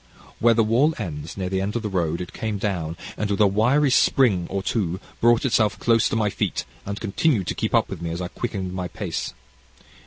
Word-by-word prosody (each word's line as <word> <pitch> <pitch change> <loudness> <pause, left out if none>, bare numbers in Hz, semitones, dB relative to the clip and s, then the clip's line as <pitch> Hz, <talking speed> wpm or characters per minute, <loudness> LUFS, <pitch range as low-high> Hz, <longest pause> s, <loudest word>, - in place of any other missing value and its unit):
"Where 115 0 +5
the 115 - +4
wall 130 +9 +3
ends, 80 -6 -6
near 95 -2 -2
the 95 +1 -1
turn 100 +2 -2
of 120 - -1
the - - -1
road, 85 -4 -1
it 90 - -7
came 110 -2 -3
down, 90 -5 -2 0.2
and 105 - -1
with 100 - -1
a 105 - +6
wiry 120 +9 +3
spring 105 -10 +3
or 95 0 -2
two 95 -4 -1 0.2
brought 120 +2 +4
itself 110 -4 +2
close 115 -2 +3
to - - -1
my 105 -2 +1
feet, - - -2 0.2
and 100 +1 -4
continued 110 - +1
to - - 0
keep - - -1
up - - +3
with - - -7
me, 85 - -3
as 85 +1 -4
I 90 - -3
quickened 95 -3 -4
my 90 -1 -3
pace. - - -4
100 Hz, 225 wpm, -23 LUFS, 90-115 Hz, 0.2 s, a